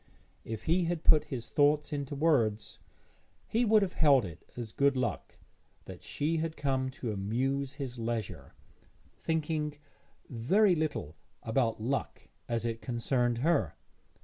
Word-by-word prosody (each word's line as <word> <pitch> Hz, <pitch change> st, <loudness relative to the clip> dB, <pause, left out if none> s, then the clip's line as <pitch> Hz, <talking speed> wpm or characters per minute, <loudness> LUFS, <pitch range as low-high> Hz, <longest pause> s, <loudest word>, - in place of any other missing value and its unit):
If 110 Hz, -1 st, -6 dB
he 175 Hz, +2 st, +2 dB
had 170 Hz, -1 st, -2 dB
put 150 Hz, -1 st, +6 dB
his 130 Hz, -6 st, -5 dB
thoughts 150 Hz, +1 st, +2 dB
into 145 Hz, 0 st, -3 dB
words, 120 Hz, -9 st, +1 dB, 0.7 s
he 230 Hz, +2 st, +1 dB
would 215 Hz, -2 st, +5 dB
have 185 Hz, -, -2 dB
held 140 Hz, -7 st, +4 dB
it 85 Hz, -2 st, -9 dB
as 115 Hz, -3 st, -5 dB
good 140 Hz, +1 st, +2 dB
luck 130 Hz, -, -3 dB, 0.5 s
that -, -, -10 dB
she 160 Hz, +3 st, -1 dB
had 160 Hz, 0 st, -3 dB
come 130 Hz, -2 st, 0 dB
to 120 Hz, -, -3 dB
amuse 130 Hz, +7 st, -1 dB
his 130 Hz, -4 st, -5 dB
leisure, 115 Hz, -2 st, -4 dB, 0.6 s
thinking 155 Hz, -2 st, -1 dB, 0.5 s
very 180 Hz, -, +3 dB
little 155 Hz, -, -2 dB, 0.3 s
about 115 Hz, -1 st, 0 dB
luck 135 Hz, +4 st, -3 dB, 0.2 s
as 115 Hz, 0 st, -1 dB
it 115 Hz, -1 st, -3 dB
concerned 120 Hz, -1 st, 0 dB
her. 145 Hz, -, +2 dB
135 Hz, 140 wpm, -31 LUFS, 115-155 Hz, 0.7 s, put